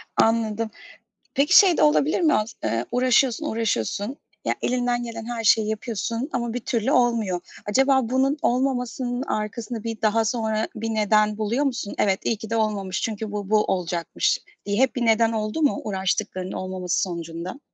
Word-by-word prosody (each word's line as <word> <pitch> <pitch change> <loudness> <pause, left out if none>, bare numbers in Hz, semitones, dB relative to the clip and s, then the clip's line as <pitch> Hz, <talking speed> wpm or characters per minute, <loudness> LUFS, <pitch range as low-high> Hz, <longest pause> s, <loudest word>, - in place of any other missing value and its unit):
Anladım, 225 -1 +1 0.6
peki, 295 +7 +6
şey 370 -5 +5
de - - +3
olabilir 300 +3 +3
mi? 315 -2 +4
As 215 +2 0
eee, 115 +1 -1
uğraşıyorsun, 255 +3 +2
uğraşıyorsun. 220 - -1 0.3
Ya, - - +1
elinden 245 -1 0
gelen 230 -1 -6
her 235 -1 -4
şeyi 215 0 +4
yapıyorsun 230 +4 -3
ama 235 -2 -2
bir 245 - -2
türlü 235 +2 -1
olmuyor. 230 -8 +2 0.3
Acaba 265 +2 +3
bunun 270 +3 +2
olmamasının 250 0 0
arkasında 220 0 -4
bir 225 -2 -5
daha 220 +1 +2
sonra 220 -1 -1
bir 225 +1 -3
neden 215 -1 +2
buluyor 230 +7 0
musun? 245 -6 -3
Evet, 195 -1 +2
iyi 225 - +1
ki 220 0 -9
de 230 - -1
olmamış 200 -4 -1
çünkü 215 -1 -3
bu 205 -1 -4
bu 215 -1 +4
olacakmış 175 -2 0 0.3
diye 205 0 -1
hep 265 - +2
bir 240 -2 0
neden 225 0 +4
oldu 215 +6 -2
mu 290 - +2
uğraştıklarının 190 -1 -2
olmaması 185 -1 -2
sonucunda? 170 - -5
225 Hz, 165 wpm, -24 LUFS, 210-245 Hz, 0.6 s, peki